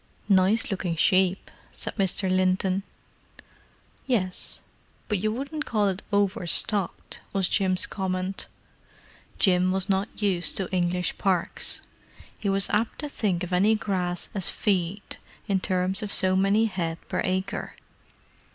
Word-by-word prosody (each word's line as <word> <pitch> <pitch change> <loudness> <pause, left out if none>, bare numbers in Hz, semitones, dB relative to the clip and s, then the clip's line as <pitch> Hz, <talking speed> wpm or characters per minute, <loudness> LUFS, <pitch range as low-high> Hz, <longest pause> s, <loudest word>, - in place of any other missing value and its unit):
"Nice 200 +4 +3
looking 185 -3 -1
sheep," 185 +3 +2 0.2
said - - -5
Mr. 195 -1 +1
Linton. 185 +1 +2 1.3
"Yes, 185 -8 0 0.5
but 210 -3 0
you 215 +3 0
wouldn't 280 +6 -4
call 210 -3 +1
it 190 +1 -3
over 200 -3 +1
stocked," 200 +3 -1
was 195 -2 +2
Jim's 185 -2 +2
comment. 185 0 -3 0.9
Jim 185 -1 +3
was 190 +1 -1
not 195 +1 -1
used 190 -4 +1
to 190 - -1
English 180 0 0
parks. 185 -4 0 0.5
He 205 - -3
was 195 0 +3
apt 220 +2 0
to 295 - -4
think 190 -9 -1
of 180 0 -4
any 205 +5 +4
grass 180 -4 -2
as 195 -3 -2
"feed," 195 -1 -1 0.3
in 195 -2 +2
terms 185 +2 0
of 210 -1 -4
so 185 0 +5
many 200 +4 +3
head 170 -6 -2
per - - -1
acre. 185 +1 -2
190 Hz, 135 wpm, -26 LUFS, 185-205 Hz, 1.3 s, so